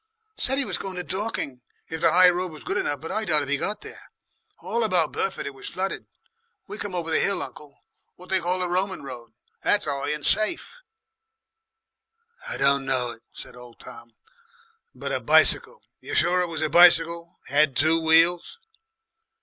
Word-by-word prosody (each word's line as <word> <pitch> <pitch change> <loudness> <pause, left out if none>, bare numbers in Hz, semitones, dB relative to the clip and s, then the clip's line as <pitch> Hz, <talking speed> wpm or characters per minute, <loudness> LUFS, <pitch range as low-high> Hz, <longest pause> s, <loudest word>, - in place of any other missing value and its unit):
"Said 265 +1 -1
'e 280 - +1
was - - -2
going 190 -1 -6
to 180 - -4
Dorking 185 - -5 0.3
if 160 0 -7
the 165 - +4
High 180 +1 +7
Road 180 0 -2
was 155 - -12
good - - -2
enough. 145 -2 -3
But 165 - -7
I 220 - -1
doubt 155 -7 +2
if 140 - -8
he 145 - +2
got 210 +7 -3
there. - - -13 0.5
All 235 0 -3
about 180 -7 +1
Burford 195 - -3
it 140 - -6
was 135 - -8
flooded. 190 +1 -4 0.6
We 410 - -8
came 200 -3 -5
over 165 -2 -3
the 160 - +3
hill, 200 - +1
uncle 145 -1 -12 0.4
what 180 +1 -16
they 190 - +1
call 180 +1 -1
the 180 -1 -2
Roman 185 0 -2
Road. 120 -4 -10 0.3
That's 205 0 +1
high 140 -1 -3
and 150 -1 -3
safe." 215 - +3 1.8
"Don't 140 0 +2
know 130 -3 -1
it," 115 - -14
said - - -11
old 125 -1 -15
Tom. 120 -1 -13 0.8
"But - - -6
a - - -1
bicycle! 485 - +3 0.2
You're - - -7
sure 180 +1 +2
it 180 - -1
was 160 -2 -3
a - - +1
bicycle? 170 -1 +4
Had 145 -1 +1
two 160 +3 +3
wheels?" 165 - +3
170 Hz, 185 wpm, -24 LUFS, 145-185 Hz, 1.8 s, High